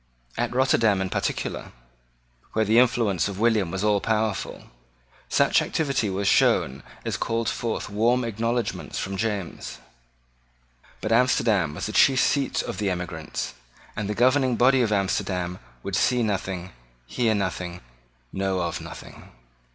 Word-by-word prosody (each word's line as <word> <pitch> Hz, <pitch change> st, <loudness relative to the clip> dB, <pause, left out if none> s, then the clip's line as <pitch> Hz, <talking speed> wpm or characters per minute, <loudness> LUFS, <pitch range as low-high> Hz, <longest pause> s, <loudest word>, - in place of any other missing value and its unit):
At 120 Hz, +1 st, -2 dB
Rotterdam 115 Hz, -6 st, +3 dB
in 95 Hz, -1 st, -2 dB
particular, -, -, -3 dB, 0.8 s
where 110 Hz, 0 st, +2 dB
the 110 Hz, +3 st, +5 dB
influence 115 Hz, -8 st, +2 dB
of 100 Hz, -2 st, -5 dB
William 110 Hz, -5 st, +2 dB
was 95 Hz, +3 st, -3 dB
all 105 Hz, -2 st, +3 dB
powerful, 110 Hz, -2 st, -2 dB, 0.6 s
such -, -, +4 dB
activity 135 Hz, -8 st, 0 dB
was 95 Hz, +1 st, -1 dB
shown 65 Hz, -6 st, +3 dB, 0.2 s
as -, -, -1 dB
called 115 Hz, 0 st, -1 dB
forth 115 Hz, 0 st, -2 dB
warm 115 Hz, +5 st, +2 dB
acknowledgments 115 Hz, +1 st, -2 dB
from 95 Hz, +1 st, -3 dB
James. 100 Hz, -3 st, -3 dB, 1.2 s
But 110 Hz, -, -2 dB
Amsterdam 115 Hz, -9 st, +3 dB
was -, -, -4 dB
the 105 Hz, -, -3 dB
chief 130 Hz, +4 st, +5 dB
seat 120 Hz, +4 st, +1 dB
of 120 Hz, -, -5 dB
the 105 Hz, -2 st, 0 dB
emigrants; 85 Hz, -3 st, -4 dB, 0.4 s
and 105 Hz, -1 st, -3 dB
the 105 Hz, -, -2 dB
governing 130 Hz, +1 st, +3 dB
body 130 Hz, +2 st, +4 dB
of 115 Hz, -3 st, +1 dB
Amsterdam 95 Hz, -3 st, -1 dB, 0.2 s
would -, -, -3 dB
see 125 Hz, -1 st, +2 dB
nothing, 95 Hz, -3 st, -2 dB, 0.3 s
hear 110 Hz, -, +1 dB
nothing, 90 Hz, -3 st, -3 dB, 0.5 s
know 95 Hz, -1 st, -1 dB
of 85 Hz, -2 st, -2 dB
nothing. -, -, -11 dB
105 Hz, 140 wpm, -25 LUFS, 95-120 Hz, 1.2 s, the